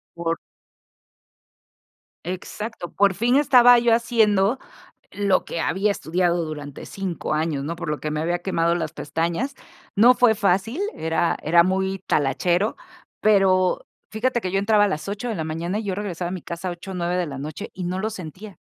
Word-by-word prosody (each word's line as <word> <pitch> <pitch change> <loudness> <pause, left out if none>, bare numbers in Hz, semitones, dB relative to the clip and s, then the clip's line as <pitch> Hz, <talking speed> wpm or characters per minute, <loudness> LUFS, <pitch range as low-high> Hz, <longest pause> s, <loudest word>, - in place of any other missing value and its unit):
Por 170 -1 -1 1.9
Exacto, 185 +1 -6
por 200 -1 +3
fin 235 +7 +1
estaba 245 -4 +7
yo 235 -1 +3
haciendo 225 -2 +3 0.5
lo 200 -2 +1
que - - -4
había 195 +5 +1
estudiado 175 0 0
durante 150 -3 -7
5 185 -5 -3
años, 155 -3 -1
¿no?, 165 +4 -3
por 165 - -6
lo 150 - -2
que 155 - -3
me 150 - -2
había 175 +2 0
quemado 170 -2 +1
las 160 -3 -3
pestañas. 165 - -2 0.4
No 240 +5 +6
fue 245 -3 +5
fácil, 205 - 0
era 160 +1 0
era 170 +3 +5
muy 190 +1 0
talachero, 175 +8 +1 0.4
pero 190 -3 +3 0.3
fíjate 240 +2 0
que 185 - -3
yo 195 - +1
entraba 205 +1 +4
a - - +1
las 155 -4 -3
8 210 +5 -4
de 225 - -2
la 160 - -3
mañana 165 +5 -3
y 220 - -3
yo 200 -2 -2
regresaba 185 -3 -4
a - - -5
mi 185 - -5
casa 170 +3 -5
8, 185 +2 -8
9 175 0 -1
de 180 -2 0
la 140 -2 -6
noche 155 +9 -6
y 185 - -5
no 180 +1 -2
lo 215 +3 -1
sentía, 190 0 -9
185 Hz, 180 wpm, -23 LUFS, 170-210 Hz, 1.9 s, estaba